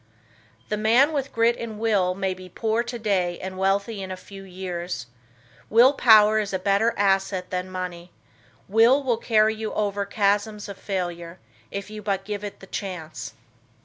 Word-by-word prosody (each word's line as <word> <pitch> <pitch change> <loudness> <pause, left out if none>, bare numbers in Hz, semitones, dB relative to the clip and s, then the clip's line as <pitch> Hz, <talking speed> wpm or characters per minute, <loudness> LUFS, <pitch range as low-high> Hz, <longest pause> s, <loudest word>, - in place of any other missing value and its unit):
The 210 - -1
man 240 +8 +4
with 280 -2 -2
grit 230 +1 +3
and 225 -2 -6
will, 205 -5 +1
may 190 -1 -1
be 185 0 -12
poor 220 +4 0
today 205 -7 -1
and 190 0 -6
wealthy 195 +2 0
in 190 - -6
a 185 - -5
few 195 +1 -12
years; 180 -6 -5 0.6
will 240 +5 +6
power 215 -4 +6
is 205 -2 -3
a - - +2
better 200 +5 +1
asset 195 -2 +1
than 180 0 -3
money; 180 -1 -6 0.6
Will 230 +7 +4
will 245 -4 +1
carry 220 -1 +3
you 220 0 -4
over 205 -1 -1
chasms 205 +1 0
of 200 -1 -9
failure, 175 -3 -4 0.3
if 200 - -6
you 215 0 -7
but 195 -2 -2
give 205 0 -4
it 205 - -7
the - - -10
chance. 155 - -6
200 Hz, 170 wpm, -24 LUFS, 185-220 Hz, 0.6 s, will